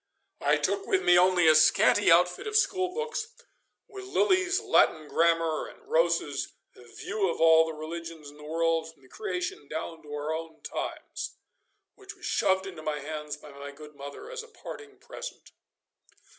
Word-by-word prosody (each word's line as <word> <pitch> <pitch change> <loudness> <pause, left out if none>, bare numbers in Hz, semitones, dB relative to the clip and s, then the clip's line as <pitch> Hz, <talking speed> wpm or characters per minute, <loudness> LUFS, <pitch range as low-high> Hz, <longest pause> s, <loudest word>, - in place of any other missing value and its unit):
I - - +3
took 400 - -1
with 385 - +2
me 175 - +6
only 180 -1 +5
a 155 - +8
scanty 155 +5 +5
outfit 180 - +3
of 430 - -4
schoolbooks, 435 +3 0 0.6
with 395 -1 -9
Lilly's 380 -1 +2
'Latin 155 -1 +3
Grammar,' 165 0 +2
and - - -16
Rosse's 165 -4 +1 0.2
'View 185 - -3
of - - -3
all 160 0 +6
the 160 - -4
Religions 160 -1 -7
in 145 - -17
the 150 - -13
World 165 +1 0
from 145 -4 -27
the - - -18
Creation 380 -2 -4
down 160 +1 -5
to 150 - -13
our 150 +1 -3
own 160 0 -7
Times,' - - -5 0.6
which 400 0 -12
was - - -11
shoved 190 0 +2
into 180 -5 -8
my 155 -1 -2
hands 150 +1 -5
by 150 0 -13
my 140 0 -8
good 150 +1 -13
mother 140 - -9
as 485 -1 -5
a 460 - -13
parting 435 -2 -10
present. - - -9
165 Hz, 170 wpm, -28 LUFS, -, 0.6 s, a